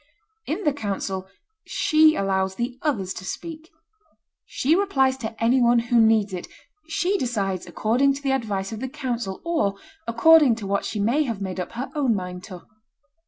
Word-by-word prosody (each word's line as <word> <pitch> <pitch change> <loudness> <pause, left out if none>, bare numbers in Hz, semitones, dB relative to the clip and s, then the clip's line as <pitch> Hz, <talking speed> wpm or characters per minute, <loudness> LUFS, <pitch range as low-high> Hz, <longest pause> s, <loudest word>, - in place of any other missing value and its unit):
In 335 +7 -2
the 295 - +2
council, 195 -5 -4 0.4
she 310 0 +3
allows 190 -1 0
the 245 +3 -4
others 200 -12 -1
to - - -8
speak; 320 - -7 0.8
she 300 +5 +1
replies 270 -10 +2
to 225 -3 -6
any 245 +3 +3
one 240 0 +4
who 235 0 +3
needs 220 -3 +3
it; 180 - -5 0.4
she 365 +4 0
decides 195 -7 -2
according 245 +10 +1
to 280 - -8
the 270 - +1
advice 210 -7 -2
of 220 - -5
the 260 +1 -4
council, 245 -8 -4
or 315 -13 0 0.3
according 275 +2 +6
to 220 -3 -7
what 200 +1 -1
she 215 - -3
may 235 +9 +2
have 230 -6 -3
made 190 -2 -4
up 180 - -5
her 245 +3 -5
own 270 -7 +1
mind 180 -1 -5
to. 180 -4 -10
235 Hz, 175 wpm, -24 LUFS, 195-275 Hz, 0.8 s, according